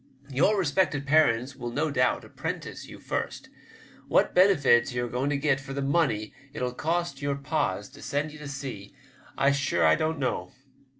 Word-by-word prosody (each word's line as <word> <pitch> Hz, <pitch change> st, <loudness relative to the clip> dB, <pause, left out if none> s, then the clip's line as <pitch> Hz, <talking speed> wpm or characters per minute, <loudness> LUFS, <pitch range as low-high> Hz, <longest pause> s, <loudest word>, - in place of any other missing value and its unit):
Your 175 Hz, +11 st, +3 dB
respected 160 Hz, -4 st, +1 dB
parents 140 Hz, -4 st, +3 dB
will 120 Hz, -2 st, -5 dB
no 145 Hz, +5 st, -1 dB
doubt 125 Hz, -2 st, +1 dB
apprentice -, -, -6 dB
you -, -, -10 dB
first. -, -, -4 dB, 0.6 s
What -, -, +3 dB
benefits 145 Hz, -11 st, +5 dB
you're 120 Hz, 0 st, -1 dB
a 120 Hz, -, -7 dB
going 130 Hz, +3 st, -1 dB
to 145 Hz, -, +1 dB
get 140 Hz, -1 st, +1 dB
for 135 Hz, 0 st, -8 dB
the 140 Hz, -, -2 dB
money 135 Hz, -8 st, +1 dB, 0.2 s
it'll 125 Hz, -1 st, -2 dB
cost 165 Hz, 0 st, -2 dB
your 140 Hz, 0 st, 0 dB
pas 140 Hz, -, -1 dB
to -, -, -15 dB
send 145 Hz, +2 st, -2 dB
ye 150 Hz, -, -12 dB
to 150 Hz, -, -7 dB
sea 135 Hz, -8 st, -7 dB, 0.4 s
I'm 140 Hz, +1 st, +4 dB
sure 140 Hz, -1 st, +1 dB
I -, -, +6 dB
don't 160 Hz, 0 st, 0 dB
know. 130 Hz, -3 st, -2 dB
140 Hz, 180 wpm, -27 LUFS, 125-155 Hz, 0.6 s, I